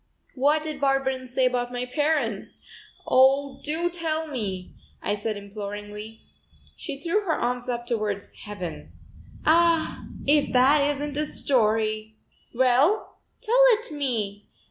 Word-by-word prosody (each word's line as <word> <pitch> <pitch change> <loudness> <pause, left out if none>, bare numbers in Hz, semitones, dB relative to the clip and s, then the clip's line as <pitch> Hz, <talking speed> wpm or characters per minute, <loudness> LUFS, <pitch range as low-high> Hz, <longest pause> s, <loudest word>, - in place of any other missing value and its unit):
"What 295 +4 +2
did 305 -3 -5
Barberin 270 -2 +1
say 255 +1 +1
about 245 -1 0
my 245 0 -3
parents? 295 +4 -1 0.5
Oh, 270 +1 +4
do 320 +4 0
tell 320 -2 -2
me," 200 -10 -4 0.3
I - - -1
said 210 +1 -3
imploringly. 205 +2 -7 0.5
She 275 - -6
threw 340 +8 0
her 365 -6 0
arms 245 +1 -2
up 240 -1 -2
towards 215 -4 -2
heaven. 175 - -8 0.5
"Ah, 335 0 +3 0.2
if 290 +1 +3
that 280 +3 +5
isn't 290 0 -3
a 300 0 0
story!" 220 -4 0 0.3
"Well, 260 - +2 0.2
tell - - +4
it 445 -4 -2
me. 225 -9 -3
260 Hz, 125 wpm, -25 LUFS, 215-300 Hz, 0.5 s, that